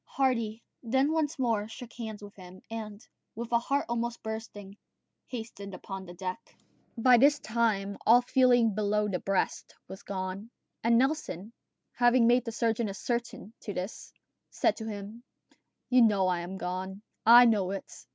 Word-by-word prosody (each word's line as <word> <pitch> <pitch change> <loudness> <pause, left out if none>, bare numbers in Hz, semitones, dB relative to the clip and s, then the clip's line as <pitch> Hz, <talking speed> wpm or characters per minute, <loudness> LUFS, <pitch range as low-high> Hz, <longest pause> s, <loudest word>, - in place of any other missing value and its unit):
Hardy 230 -5 -1 0.2
then 265 +5 +1
once 315 -1 0
more 225 -5 0
shook 235 +1 -10
hands 220 -3 -7
with 205 0 -11
him, 185 -1 -13
and, 215 0 -7 0.3
with 235 +2 -6
a 235 - +4
heart 275 +4 -1
almost 235 0 -3
bursting, 215 -3 -7 0.5
hastened 220 -5 -7
upon 190 -1 -8
deck. 185 +1 -5 0.6
By 245 +1 +6
this 290 +3 +5
time 215 -4 -1
all 240 +2 +6
feeling 245 -3 +4
below 210 0 +1
the 185 -3 -2
breast 195 -1 -2
was 190 +1 -9
gone, 190 +2 -5 0.3
and 230 0 +4
Nelson, 245 - -1 0.4
having 240 0 +4
made 245 +1 +4
the 230 - -3
surgeon 225 -1 0
ascertain 235 +1 -4
this, 195 -1 -6 0.4
said - - +1
to 220 - -6
him: 210 +2 -7 0.7
"You 255 -1 +5
know 205 -4 +4
I 180 -1 +1
am 180 +3 -6
gone. 190 +2 -5 0.2
I 240 +2 +9
know 210 -5 +2
it. 195 0 -7
220 Hz, 150 wpm, -29 LUFS, 200-240 Hz, 0.7 s, I